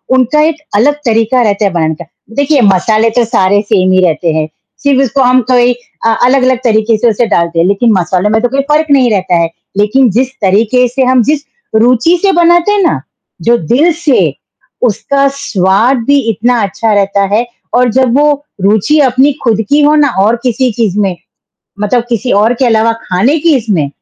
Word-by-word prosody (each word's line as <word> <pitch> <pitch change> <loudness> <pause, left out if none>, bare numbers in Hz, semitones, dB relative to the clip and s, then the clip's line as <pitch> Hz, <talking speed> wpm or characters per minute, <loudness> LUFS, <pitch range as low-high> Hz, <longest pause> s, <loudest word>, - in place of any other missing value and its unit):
उनका 260 +4 +1
एक 320 - -4 0.2
अलग 275 +8 +2
तरीका 230 +2 +1
रहता 205 -1 0
है 195 - 0
बनाने 160 -2 -1
का 170 - -9 0.3
देखिए, 285 -1 +1
मसाले 215 +3 +2
तो 240 - +4
सारे 205 -3 +1
सेम 190 -3 0
ही 185 0 +3
रहते 165 0 -1
हैं, 155 0 -1 0.4
सिर्फ 275 -1 +2
उसको 270 +1 -1
हम 250 +1 +3
कोई 245 0 +3 0.3
अ, - - +3 0.2
अलग-अलग 255 -1 +2
तरीके 220 0 +1
से 235 +2 +1
उसे 230 +2 0
डालते 170 -1 -1
हैं, 170 - +2
लेकिन 210 +4 +1
मसाले 185 +4 -1
में 220 +1 0
तो 245 - 0
कोई 275 +2 -1
फ़र्क 310 +1 +1
नहीं 260 -4 +3
रहता 185 -3 0
है। 165 - -1 0.3
लेकिन 230 +5 +2
जिस 255 +5 0
तरीके 220 +6 +2
से 260 +2 -2
हम 255 -1 +2
जिस 300 +2 -1 0.3
रुचि 250 +9 +2
से 395 -1 +2
बनाते 345 +2 +2
हैं 410 -1 +1
ना, 335 - 0 0.4
जो 235 +1 +2
दिल 265 - +1
से, 310 -5 0 0.5
उसका 275 +5 0
स्वाद 220 0 +1
भी 285 0 +3
इतना 235 +2 0
अच्छा 215 +2 -2
रहता 200 0 0
है 235 +3 +1 0.3
और 245 0 +2
जब 260 0 +1
वो 295 0 +3 0.3
रुचि 215 +10 +1
अपनी 265 +2 +2
खुद 225 -3 +1
की 295 +1 +3
हो 295 +1 +3
ना 295 -1 +3
और 220 +4 +2
किसी 250 0 0
चीज़ 215 -3 -2
में, 190 -3 -1 0.7
मतलब 230 +3 0
किसी 240 +1 -2
और 215 +4 +2
के 255 +1 -1
अलावा 225 0 +2
खाने 220 - 0
की 330 -2 +2
इसमें 200 - -1
235 Hz, 195 wpm, -10 LUFS, 205-265 Hz, 0.7 s, तो